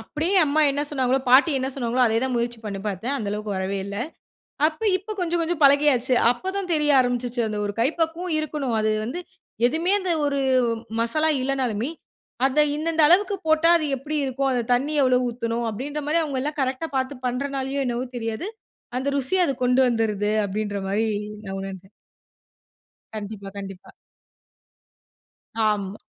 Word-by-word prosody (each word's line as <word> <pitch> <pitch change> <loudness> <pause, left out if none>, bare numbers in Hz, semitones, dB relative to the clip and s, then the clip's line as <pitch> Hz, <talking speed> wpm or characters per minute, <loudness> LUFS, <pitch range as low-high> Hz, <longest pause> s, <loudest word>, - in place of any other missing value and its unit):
அப்படியே 315 - -2
அம்மா 300 +1 +1
என்ன 285 +1 -1
சொன்னாங்களோ, 265 -2 +1
பாட்டி 275 +6 +7
என்ன 260 0 -1
சொன்னாங்களோ, 250 -1 0
அதே 225 0 +1
தான் 260 -1 -1
முயற்சி 235 0 -2
பண்ணி 200 -2 -4
பார்த்தேன். 210 +7 -2
அந்தளவுக்கு 210 -1 -3
வரவே 190 +1 -2
இல்ல. 200 0 -6 0.7
அப்ப 315 +6 -6 0.2
இப்ப 410 +3 -7
கொஞ்சம் 345 -1 0
கொஞ்சம் 330 -1 -2
பழகியாச்சு. 275 -3 +4 0.2
அப்போதான் 380 +8 -4
தெரிய 300 -1 +2
ஆரம்பிச்சுச்சு, 245 -1 0
அந்த 215 -1 -3
ஒரு 205 - -3
கை 235 - +4
பக்குவம் 330 +2 -1
இருக்கணும். 290 -5 -2
அது 215 0 +1
வந்து 255 +10 -4 0.5
எதுவுமே 325 +8 0
அந்த 370 -2 -1
ஒரு 280 -1 0 0.6
மசாலா 305 +8 +1
இல்லனாலுமே, 255 -3 -1 0.6
அத 275 +3 0 0.2
இந்தந்த 320 +1 0
அளவுக்கு 390 +4 +4
போட்டா 315 +1 +4
அது 315 - -2
எப்படி 295 +4 -5
இருக்கும்? 270 +1 -1
அந்த 245 -2 0
தண்ணி 275 +5 0
எவ்ளோ 255 -1 +4
ஊத்தணும்? 235 0 -2
அப்படின்ற 285 +7 -4
மாரி 320 +3 +2
அவங்க 280 -4 -2
எல்லாம் 295 +2 -3
கரெக்ட்‌டா 265 +5 -2
பார்த்து 260 0 -3
பண்ணுறதுனாலயோ 275 +2 -2
என்னவோ 240 +1 -2
தெரியாது. 225 - -3 0.5
அந்த 260 +2 -2
ருசிய 350 +8 +2
அது 275 - -1
கொண்டு 250 +1 +4
வந்துருது. 210 -3 0
அப்படின்ற 205 0 -3
மாரி 215 +3 +1 0.4
நான் 195 -1 -5
உணர்ந்தேன். 190 -1 -8 1.3
கண்டிப்பா, 205 -2 -6
கண்டிப்பா. 195 -2 -9 1.8
ஆமா. 200 -2 -1
260 Hz, 155 wpm, -24 LUFS, 225-300 Hz, 1.8 s, பாட்டி